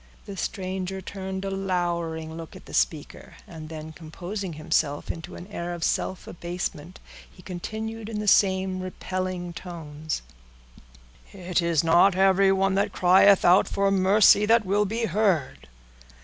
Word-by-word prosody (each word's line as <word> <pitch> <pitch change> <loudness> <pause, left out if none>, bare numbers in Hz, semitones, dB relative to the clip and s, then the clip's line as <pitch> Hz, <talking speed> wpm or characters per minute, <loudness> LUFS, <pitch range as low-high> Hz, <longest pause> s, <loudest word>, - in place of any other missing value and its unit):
The 200 - -8
stranger 190 0 -4
turned 190 0 -6
a 195 - -3
lowering 170 -4 -2
look 165 -1 -9
at - - -13
the - - -12
speaker, 155 -3 -2
and 155 -2 -9
then 160 0 -7
composing 175 +4 -6
himself 155 -2 -1
into 165 - -9
an 175 - -9
air 175 -3 -5
of 170 - -6
self 185 - -1
abasement, 175 -1 -6 0.3
he 180 - -18
continued 220 +5 -6
in 215 -2 -4
the 210 - -4
same 190 -2 +3
repelling 185 -1 -4
tones,— 155 -3 -6 1.1
"It 180 -2 -2
is 170 -2 +1
not 175 +4 +5
everyone 195 0 +3
that 200 +2 +1
crieth 190 +2 +5
out 180 +2 +6
for 200 0 +1
mercy, 200 +2 +5
that 230 -1 +4
will 205 +2 +2
be 225 +3 -2
heard. 185 - 0
185 Hz, 145 wpm, -25 LUFS, 170-195 Hz, 1.1 s, out